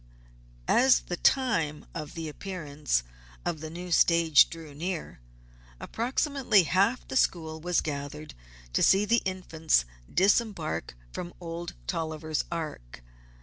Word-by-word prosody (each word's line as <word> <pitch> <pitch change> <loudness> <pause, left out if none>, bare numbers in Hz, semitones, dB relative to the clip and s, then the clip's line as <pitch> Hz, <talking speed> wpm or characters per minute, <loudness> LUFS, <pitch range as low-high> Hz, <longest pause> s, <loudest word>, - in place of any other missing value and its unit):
As 260 +1 +5
the 175 - -4
time 175 - +1
for 155 - -3
the 160 +2 -7
appearance 150 - -2 0.4
of 160 - -2
the 170 +3 -7
stage 165 -3 +5
drew 160 -3 -9
near, 170 - -4 0.6
approximately 255 - +1
half 195 - +1
the - - -5
school 160 -9 +1
was 175 +1 +1
gathered 145 0 -5 0.4
to - - +2
see 195 +2 +5
the 230 +2 +3
Infants 165 - +1 0.3
disembark 195 - +1 0.2
from 175 0 -6
Old 170 0 -6
Dolliver's 155 -2 -2
Ark. 150 - -6
165 Hz, 115 wpm, -28 LUFS, 155-190 Hz, 0.6 s, As